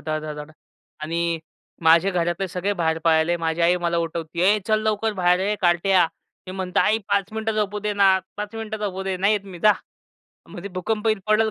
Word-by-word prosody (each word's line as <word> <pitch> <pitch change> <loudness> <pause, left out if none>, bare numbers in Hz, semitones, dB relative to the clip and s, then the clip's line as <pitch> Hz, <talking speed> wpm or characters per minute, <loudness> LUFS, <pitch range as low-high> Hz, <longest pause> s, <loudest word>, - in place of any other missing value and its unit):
धड 155 0 -2
धड-धड 150 0 -7 0.5
आणि 170 +1 -1 0.4
माझे 165 +4 +5
घरातले 175 +1 -1
सगळे 185 +3 -2
बाहेर 160 0 +1
पाळले. 165 +1 +3
माझी 165 0 -2
आई 175 +2 +4
मला 170 0 0
उठवती, 165 0 -4
"ए 200 +4 +4
चल 215 -1 +2
लवकर 215 0 0
बाहेर 180 0 +3
ये 205 +2 0
कार्ट्या." 175 0 +3 0.4
मी 185 - -6
म्हणतो, 185 -1 -1
"आई 220 - +3
5 200 0 0
मिनिटं 220 0 -2
झोपू 210 -1 -1
दे 210 0 -2
ना, 195 -2 +4 0.2
5 210 +1 -5
मिनिटं 220 -1 -5
झोपू 190 -1 -4
दे. 190 -1 -2
नाही 195 +3 +2
येत 205 -2 -1
मी 190 -3 -10
जा." 215 - +7 0.8
म्हटली, 180 +3 -8
"भूकंप 205 +4 -3
येईल, 215 -2 +1
पडल 215 +1 +3
185 Hz, 200 wpm, -23 LUFS, 170-210 Hz, 0.8 s, जा